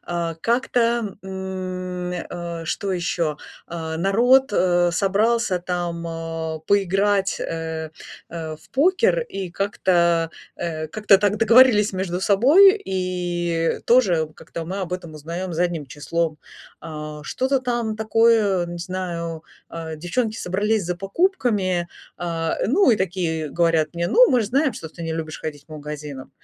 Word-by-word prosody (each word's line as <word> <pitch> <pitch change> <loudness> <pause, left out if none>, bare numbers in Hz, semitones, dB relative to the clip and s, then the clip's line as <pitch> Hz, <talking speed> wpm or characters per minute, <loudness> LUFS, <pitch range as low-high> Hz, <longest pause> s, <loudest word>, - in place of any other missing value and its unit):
А, 170 -1 -2
как-то, 235 -2 0
м, 185 -1 -5
э, 170 -1 -5
что 195 +3 -2
ещё, 170 -3 -1 0.3
а, 160 -1 -5
народ, 235 +9 +4
э, 175 -2 +3
собрался 205 +2 +1
там, 175 -1 -3
а, 165 -1 -4
поиграть, 195 0 +2
э, 160 -1 -4 0.4
э, 160 -2 -5
в 155 - -23
покер 375 - +3
и 195 - -6
как-то, 170 -4 +1 0.2
э, 160 -2 -4
как-то 205 +3 +4
так 205 +1 +1
договорились 225 -2 +5
между 185 -1 -2
собой 305 - +6
и 175 -3 -1
тоже 185 -11 +4
как-то 165 - -7
мы 185 +4 -4
об 180 -2 -4
этом 175 -3 -5
узнаём 170 +4 -5
задним 170 -3 -1
числом. 155 +3 -2 0.4
А, 150 -1 -7
что-то 265 - 0
там 240 -3 -2
такое, 220 -4 +3
не 175 0 -6
знаю, 170 -2 -4 0.3
э, 160 -1 -6
девчонки 215 +8 -2
собрались 210 +2 0
за 180 +1 -2
покупками, 195 - 0 0.3
а, 165 -2 -2
ну, 370 - +4
и - - +2
такие 170 -5 -2
говорят 165 -1 +1
мне: 170 0 -1
"Ну, 485 - +5
мы 245 -2 +3
же - - -3
знаем, 270 +3 +1
что 160 - -7
ты 170 +2 -10
не 165 -1 -3
любишь 160 -1 -5
ходить 145 -2 -6
по 155 - -10
магазинам". 150 -2 -7
180 Hz, 140 wpm, -22 LUFS, 165-210 Hz, 0.4 s, собой